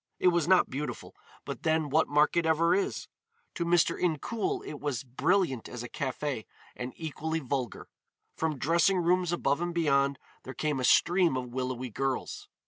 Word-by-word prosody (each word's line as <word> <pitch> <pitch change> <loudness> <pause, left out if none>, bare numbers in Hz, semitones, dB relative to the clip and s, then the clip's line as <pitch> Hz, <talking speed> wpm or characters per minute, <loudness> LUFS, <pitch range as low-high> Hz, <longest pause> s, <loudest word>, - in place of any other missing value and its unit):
It 180 - +4
was 170 -3 +1
not 185 0 +4
beautiful, 145 +3 -5 0.3
but - - -6
then 160 -2 +1
what 160 +2 +3
market 150 +3 +3
ever 160 +1 +3
is? 395 0 -1 0.5
To 170 - -2
Mr. 170 -1 +3
Incoul 230 - -1
it - - -7
was 140 -5 -2
brilliant 135 - 0
as 125 -1 -6
a 120 - -7
café, 130 -3 -3 0.3
and 125 +1 -5
equally 160 0 -3
vulgar. 130 -4 -3 0.5
From 160 -2 -1
dressing 170 +7 +3
rooms 180 0 +2
above 150 -3 0
and 175 0 -2
beyond 140 -4 +2 0.2
there 130 - -9
came 150 +1 -1
a - - -2
stream 175 -3 +4
of 125 -1 -4
willowy 130 -1 -3
girls. 135 +3 -3
155 Hz, 165 wpm, -29 LUFS, 130-170 Hz, 0.5 s, It